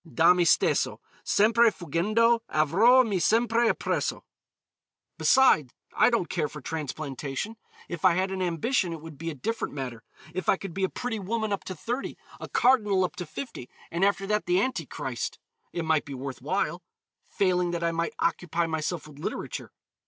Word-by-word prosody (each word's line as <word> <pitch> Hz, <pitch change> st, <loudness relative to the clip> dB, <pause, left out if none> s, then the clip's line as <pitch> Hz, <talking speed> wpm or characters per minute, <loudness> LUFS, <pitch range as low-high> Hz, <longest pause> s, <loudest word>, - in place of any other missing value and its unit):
Da 170 Hz, +2 st, +6 dB
me 180 Hz, -1 st, +2 dB
stesso 170 Hz, -, +2 dB, 0.2 s
Sempre 230 Hz, +3 st, +4 dB
fuggendo, 215 Hz, +7 st, +1 dB
avrò 205 Hz, -, +5 dB
me 200 Hz, -4 st, 0 dB
sempre 230 Hz, +4 st, +3 dB
appresso. -, -, -1 dB, 1.0 s
Beside 155 Hz, -, +4 dB, 0.2 s
I -, -, +5 dB
don't 230 Hz, -8 st, 0 dB
care 155 Hz, -5 st, -1 dB
for 150 Hz, -, -9 dB
transplantation. 145 Hz, -, -4 dB, 0.3 s
If 170 Hz, -3 st, -6 dB
I 185 Hz, -3 st, +5 dB
had 190 Hz, +1 st, 0 dB
an 190 Hz, -1 st, -3 dB
ambition 180 Hz, -, 0 dB
it 165 Hz, -, -6 dB
would 160 Hz, -3 st, -11 dB
be 165 Hz, +1 st, -3 dB
a 160 Hz, -, -5 dB
different 225 Hz, -, -3 dB
matter. 125 Hz, -4 st, -5 dB, 0.3 s
If 185 Hz, +1 st, -2 dB
I -, -, +4 dB
could 195 Hz, -3 st, -7 dB
be 195 Hz, -, -2 dB
a 190 Hz, -, +2 dB
pretty 245 Hz, -3 st, -4 dB
woman 220 Hz, +2 st, -2 dB
up 200 Hz, -, -3 dB
to 185 Hz, -, -5 dB
thirty, 245 Hz, +7 st, -4 dB, 0.2 s
a -, -, -7 dB
cardinal 210 Hz, -7 st, +3 dB
up 180 Hz, -, -2 dB
to 180 Hz, -2 st, -5 dB
fifty, 230 Hz, -, -7 dB, 0.2 s
and 170 Hz, +3 st, -1 dB
after 195 Hz, 0 st, +2 dB
that 210 Hz, -1 st, -1 dB
the 180 Hz, +1 st, +3 dB
Anti 260 Hz, +6 st, -1 dB
Christ, -, -, -4 dB, 0.3 s
it 170 Hz, -2 st, -3 dB
might 160 Hz, -1 st, +2 dB
be 140 Hz, -, -7 dB
worth 130 Hz, 0 st, -6 dB
while. 175 Hz, +3 st, -1 dB, 0.5 s
Failing 180 Hz, -2 st, +1 dB
that 170 Hz, -1 st, -3 dB
I 170 Hz, -, +2 dB
might 165 Hz, 0 st, -2 dB
occupy 175 Hz, -, 0 dB
myself 160 Hz, 0 st, -3 dB
with 145 Hz, -2 st, -14 dB
literature. -, -, -5 dB
180 Hz, 180 wpm, -27 LUFS, 160-220 Hz, 1.0 s, Da